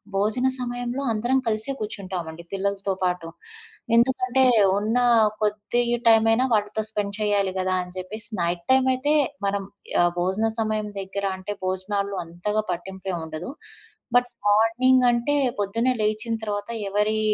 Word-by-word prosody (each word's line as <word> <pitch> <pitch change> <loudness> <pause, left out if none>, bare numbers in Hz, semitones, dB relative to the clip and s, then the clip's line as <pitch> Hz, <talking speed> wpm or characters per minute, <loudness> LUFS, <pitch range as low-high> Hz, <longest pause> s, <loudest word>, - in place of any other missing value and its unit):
భోజన 215 +6 +1
సమయంలో 245 +1 -3
అందరం 240 +5 +1
కలిసే 220 +4 +2
కూర్చుంటామండి 180 -6 -5
పిల్లలతో 195 0 -1
పాటు. 180 -2 -1 0.7
ఎందుకంటే, 255 +1 +3 0.4
ఉన్న 220 +3 0 0.4
కొద్ది 210 +3 0 0.3
టైమ్ 225 -1 +6
అయినా 250 +3 +3
వాళ్ళతో 210 +1 0
స్పెండ్ 205 -2 -3
చేయాలి 205 -2 +1
గదా! 185 0 0
అని 180 0 -12
జెప్పేసి 205 +5 -2
నైట్ 170 0 -1
టైమ్ 260 0 +4
అయితే 290 +4 0 0.3
మనం 200 0 -1 0.4
ఆహ్, 175 - +3
భోజన 190 +5 +1
సమయం 215 -1 -1
దగ్గర 195 +1 -4
అంటే 190 +2 -5
భోజనాల్లో 200 +1 -2
అంతగా 210 +6 -2
పట్టింపేంముండదు. 175 0 -5 0.6
బట్ 245 0 +4 0.2
మార్నింగ్ 230 +5 +4
అంటే 240 +4 0 0.3
పొద్దున్నే 230 +5 +1
లేచిన 215 +2 -1
తర్వాత 205 0 -3 0.2
ఎవరి 210 +2 +1
210 Hz, 130 wpm, -24 LUFS, 190-230 Hz, 0.7 s, టైమ్